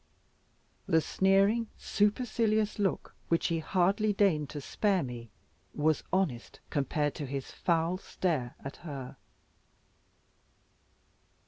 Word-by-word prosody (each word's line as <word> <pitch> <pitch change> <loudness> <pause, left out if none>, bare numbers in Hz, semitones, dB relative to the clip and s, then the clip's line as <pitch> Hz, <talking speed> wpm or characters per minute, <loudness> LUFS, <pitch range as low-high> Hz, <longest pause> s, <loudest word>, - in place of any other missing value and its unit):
The 160 - +4
sneering, 195 +7 +3
supercilious 215 0 +1
look 195 -2 -1
which 165 - +1
he 165 -1 0
hardly 195 +5 +2
deigned 170 -8 +2
to 150 - -5
spare 195 +6 +1
me, 120 -3 -7 0.5
was 155 +1 +2
honest, 165 -11 -1
compared 145 0 0
to 145 - -5
his 135 0 -4
foul 170 +1 0
stare 155 -11 -2
at 135 - -7
her. 140 -6 -7
170 Hz, 105 wpm, -30 LUFS, 145-200 Hz, 0.5 s, The